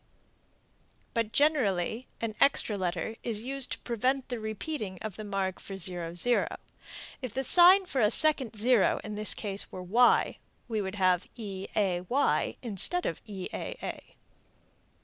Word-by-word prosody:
But 230 -2 -1
generally 245 - +1
an 225 -1 -2
extra 275 -6 +3
letter 185 +3 -3
is 220 -2 -3
used 270 +1 -2
to - - -7
prevent 255 +3 -1
repeating 220 - -4
the 215 +1 -8
mark 195 -2 -2
for 195 - -7
0. 175 -2 -3 1.1
If 255 -3 -6
the 265 - 0
sign 365 +6 +7
for 270 -8 -1
a 210 - +5
second 265 -3 +3
0 225 0 +3
in 215 - -6
this 210 0 +1
case 200 -2 -3
were 185 - -7
y, 230 +7 +3 0.3
we 220 -3 -1
would 190 0 -4
have 185 -3 +2
eay 195 +2 -1
instead 240 - 0
of 165 - -3
eaa. 195 -3 -6
215 Hz, 130 wpm, -29 LUFS, 190-255 Hz, 1.1 s, sign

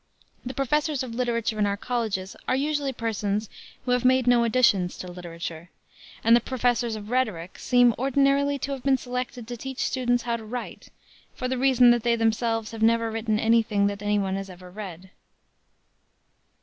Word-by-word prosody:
The 255 +1 -6
professors 290 +1 0
of 245 -3 -6
literature 230 -2 -1
in 205 - +3
our 200 0 -1
colleges 215 -5 -3
are 255 - +2
usually 285 0 0
persons 215 -3 -2 0.4
who 250 - -1
have 250 0 +2
made 255 0 +4
no 245 -1 +4
additions 220 -7 +2
to 180 - -7
literature, 170 -1 -7 0.5
and 230 +1 +6
the - - +5
professors 245 -2 0
of 210 +1 -8
rhetoric 210 -9 -1
seem 245 -1 +4
ordinarily 275 +2 +2
to 280 - -5
have 270 -2 -4
been 270 0 +3
selected 250 -2 -5
to 240 - -5
teach 265 +2 -7
students 245 -2 0
how 235 -1 -1
to 225 - -10
write, 240 +3 -7 0.5
for 255 - -3
the 260 - -1
reason 255 -2 +6
that 240 -1 +2
they 235 +1 +2
themselves 225 -1 0
have 225 -1 -8
never 230 0 +3
written 220 -1 -1
any 230 +1 +4
thing 205 -2 0
that 200 0 -2
any 205 0 +1
one 195 -1 -1
has 195 0 -6
ever 180 0 -12
read. 190 -2 -9
230 Hz, 185 wpm, -25 LUFS, 210-255 Hz, 0.5 s, and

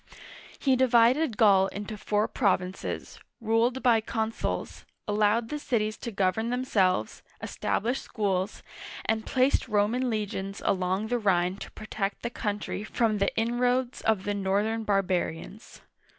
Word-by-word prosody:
He 265 -2 +2
divided 245 +1 +3
Gaul 195 -3 +5
into 205 +2 -6
four 210 +1 0
provinces, 190 -5 -2 0.2
ruled 230 +3 +1
by 235 -3 +4
consuls, 220 0 -3 0.2
allowed 210 +2 +2
the 300 - -3
cities 215 -6 -1
to - - -5
govern 205 +2 0
themselves, 195 - 0 0.2
established 240 +6 -2
schools, 195 -2 -2 0.4
and 220 0 -1
placed 260 +1 +2
Roman 225 +4 +1
legions 200 -3 -3
along 190 +3 0
the 245 0 +1
Rhine 185 -3 +1
to - - -8
protect 210 -2 -4
the 235 - -2
country 210 -2 -3
from 215 -1 0
the 200 - +2
inroads 245 +2 0
of 215 -4 +1
the 205 - -1
northern 205 +3 0
barbarians. 195 0 -2
215 Hz, 130 wpm, -27 LUFS, 195-235 Hz, 0.4 s, Gaul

